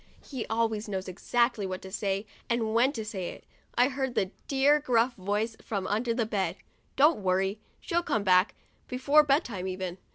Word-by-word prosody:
(he 260 -5 -5
always 225 -1 -1
knows 190 -1 -3
exactly 235 +4 0
what 185 -1 -3
to 190 - -10
say 200 0 -1 0.2
and 230 -2 0
when 245 +4 +4
to 225 -6 -5
say 190 -5 -4
it) - - -11 0.3
I 245 +1 +5
heard 265 -2 -3
that 190 -1 0 0.2
dear 280 +2 +4
gruff 250 -3 +2
voice 210 +4 -2
from 200 -4 -3
under 225 +5 0
the 230 0 0
bed, 205 -3 -1 0.4
"Don't 295 -1 +5
worry! 190 +2 +1 0.2
She'll 345 -1 0
come 220 -11 -1
back, 185 0 +4 0.3
before 280 +4 +4
bedtime 270 - 0
even." 185 -1 -4
220 Hz, 175 wpm, -28 LUFS, 195-255 Hz, 0.4 s, I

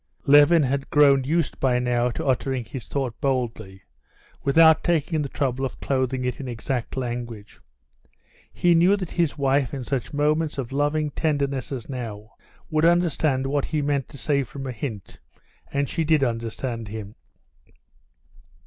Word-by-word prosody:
Levin 145 +3 +6
had 135 +1 -1
grown 140 -2 +5
used 165 +2 0
by 130 -2 +2
now 125 0 +1
to 160 +6 -5
uttering 130 -2 0
his 120 +2 -8
thought 135 -4 -2
boldly, 115 -8 -2 0.6
without 160 +2 +5
taking 160 -2 +1
the 140 - -3
trouble 130 -1 -2
of 130 - -4
clothing 130 -1 -1
it 125 - -2
in 135 - -6
exact 120 +1 -4
language. 120 -4 -5 0.9
He 175 -1 +3
knew 175 +4 +5
that 185 -4 -5
his 170 -4 0
wife, 140 -1 +1
in 135 - -5
such 130 -1 -3
moments 150 +1 0
of 130 -3 -4
loving 145 +2 0
tenderness 140 -5 -1
as 125 -5 -5
now, 115 -5 -6 0.4
would 155 0 +1
understand 165 -5 +2
what 140 +1 0
he 155 -2 -1
meant 140 -2 -1
to 140 - -11
say 140 +2 +1
from 135 +1 -7
a 130 - -3
hint, 110 -4 -7 0.5
and 140 0 0
she 165 - -1
did 155 -2 +3
understand 115 -1 -3
him. 105 -1 -7
135 Hz, 160 wpm, -24 LUFS, 125-150 Hz, 0.9 s, Levin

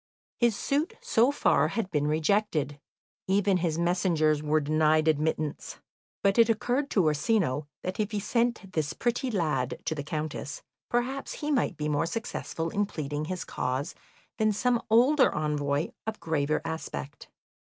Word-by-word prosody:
His 235 -3 +3
suit 300 - -1
so 235 +3 +3
far 285 - +3
had 195 +2 -3
been 150 -2 +1
rejected, 155 -2 +1 0.5
even 195 0 +3
his 165 -3 -1
messengers 170 -3 +2
were 155 +1 +2
denied 155 +1 +2
admittance; 155 -1 -1 0.5
but 200 +3 +3
it 230 0 +6
occurred 245 +5 0
to 195 - +2
Orsino 150 - +1 0.2
that 185 +3 -4
if 210 -1 +1
he 210 -2 -2
sent 230 -3 -1
this 155 -1 -1
pretty 245 +2 -1
lad 150 - -1
to - - 0
the 150 - -4
Countess 150 0 -4 0.3
perhaps 255 +3 -1
he 300 0 -3
might 245 - +1
be 150 - -2
more 150 +1 +1
successful 165 -5 -4
in 205 0 0
pleading 150 -3 -4
his 180 +2 -4
cause 130 +3 -2 0.5
than 215 0 +3
some 240 +3 +1
older 255 +6 +5
envoy 150 0 0 0.2
of 220 -1 -3
graver 155 -1 0
aspect. 160 -3 -6
170 Hz, 155 wpm, -28 LUFS, 150-220 Hz, 0.5 s, it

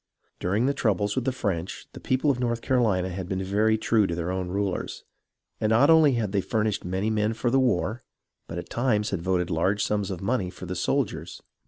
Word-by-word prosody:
During 100 +7 +1
the 140 - +2
troubles 105 -5 0
with 130 -2 -1
the 130 - +2
French, 95 -8 -3
the - - -9
people 130 +3 +1
of 125 - -3
North 120 -2 -1
Carolina 105 -8 +2
had 90 0 -5
been 95 -1 -2
very 105 +3 +2
true 110 -2 +2
to 85 - -2
their 85 +1 -2
own 95 -1 -2
rulers, 100 0 -2 0.6
and 110 - +1
not 125 +8 +5
only 160 -4 +6
had 110 -5 -1
they 100 -1 +1
furnished 110 0 -1
many 95 +4 -1
men 110 0 +1
for 120 +2 0
the 135 - +4
war, 115 -2 +1 0.5
but 85 - -6
at 85 - -7
times 115 -4 +1
had 95 -4 -2
voted 90 -1 0
large 95 +5 +1
sums 105 -2 -1
of 95 -3 -4
money 100 -1 -1
for 90 - -9
the 90 - -4
soldiers. - - -2
105 Hz, 215 wpm, -26 LUFS, 95-120 Hz, 0.6 s, only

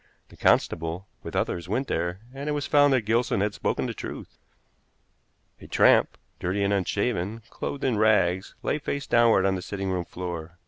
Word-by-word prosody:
The - - -15
constable, 85 +3 +1 0.2
with - - -8
others, 85 +1 -2
went 130 +6 -1
there, 85 +3 -2
and 140 +2 -5
it - - 0
was 145 -1 -2
found 145 -1 +5
that 130 -4 +2
Gilson 115 -1 +1
had 105 0 0
spoken - - -1
the - - -3
truth. - - -8 1.2
A - - -12
tramp, - - +4 0.2
dirty 95 +3 -1
and 100 +1 +2
unshaven, 100 +2 -1
clothed 140 - -5
in 120 -5 +1
rags, 95 -4 +2
lay 150 - 0
face 140 -1 -3
downward 115 -5 +4
on 95 - +3
the 95 - -3
sitting 95 +1 -4
room 90 -2 -2
floor. 85 -2 -6
100 Hz, 180 wpm, -26 LUFS, 90-120 Hz, 1.2 s, found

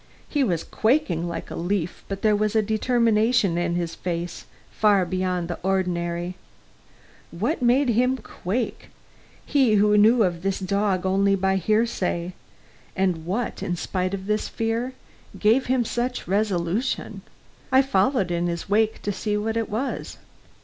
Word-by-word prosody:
He 290 -2 +1
was 175 -9 0
quaking 205 - +1
like 165 -1 -6
a - - -5
leaf, 175 0 -2
but 195 0 -5
there 215 -1 +4
was 215 +1 0
a 220 - +4
determination 225 -2 +2
in 175 0 0
his 170 -2 -2
face 170 0 -4 0.3
far 205 -3 +3
beyond 185 -1 -1
the 175 - -5
ordinary. 180 -1 -1 0.9
What 225 - -2
made 250 +2 +3
him 250 +3 +2
quake 225 0 -4 0.6
he 265 -7 +3
who 210 0 +4
knew 225 +2 +5
of 175 -3 -1
this 195 +1 -1
dog 195 -1 0
only 195 +1 +3
by 190 0 +1
hearsay 190 -4 0 0.6
and 180 -4 0
what, 220 +6 -2
in 175 - -2
spite 185 +2 -2
of 190 -1 -8
this 210 +1 0
fear, 230 +3 -2 0.4
gave 225 +5 +3
him 250 -1 +2
such 245 -1 -2
resolution? 200 +3 -1 0.5
I 265 +1 +6
followed 205 -5 +1
in 175 0 0
his 170 -1 -3
wake 215 +2 +1
to 205 - -1
see 210 +1 -2
what 220 +2 -2
it 230 -1 -1
was. 230 +7 -3
200 Hz, 150 wpm, -24 LUFS, 180-225 Hz, 0.9 s, I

